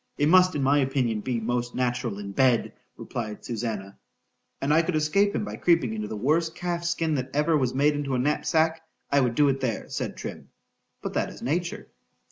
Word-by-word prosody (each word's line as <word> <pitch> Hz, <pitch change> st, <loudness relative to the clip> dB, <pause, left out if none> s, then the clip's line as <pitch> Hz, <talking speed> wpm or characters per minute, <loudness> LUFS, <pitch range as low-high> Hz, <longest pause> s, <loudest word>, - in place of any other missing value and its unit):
—It 145 Hz, -, +2 dB
must, 185 Hz, +1 st, +6 dB
in 140 Hz, -, 0 dB
my 140 Hz, +2 st, +4 dB
opinion, 130 Hz, -5 st, 0 dB
be 120 Hz, +1 st, -2 dB
most 120 Hz, +2 st, -2 dB
natural 125 Hz, -4 st, -1 dB
in 100 Hz, -1 st, -6 dB
bed, 125 Hz, +2 st, +2 dB, 0.2 s
replied 110 Hz, -3 st, -6 dB
Susannah.—And 110 Hz, +4 st, -6 dB
could 175 Hz, 0 st, -1 dB
I -, -, +3 dB
escape 200 Hz, +7 st, +2 dB
him -, -, -1 dB
by -, -, -6 dB
creeping 165 Hz, -10 st, +2 dB
into 105 Hz, -1 st, -3 dB
the 110 Hz, -, -5 dB
worst 160 Hz, +8 st, +1 dB
calf's 170 Hz, -1 st, -2 dB
skin 165 Hz, -2 st, 0 dB
that 130 Hz, -2 st, -2 dB
ever 150 Hz, +2 st, +3 dB
was 130 Hz, -4 st, 0 dB
made 145 Hz, +2 st, +3 dB
into 145 Hz, -2 st, -2 dB
a -, -, +1 dB
knapsack, 160 Hz, +4 st, +1 dB, 0.3 s
I 140 Hz, 0 st, +4 dB
would 120 Hz, -2 st, 0 dB
do 145 Hz, +2 st, +4 dB
it 135 Hz, -1 st, +1 dB
there—said 120 Hz, -4 st, -3 dB
Trim—but -, -, -10 dB
that -, -, 0 dB
is -, -, -11 dB
nature. 170 Hz, +6 st, -2 dB
135 Hz, 190 wpm, -26 LUFS, 120-160 Hz, 0.3 s, must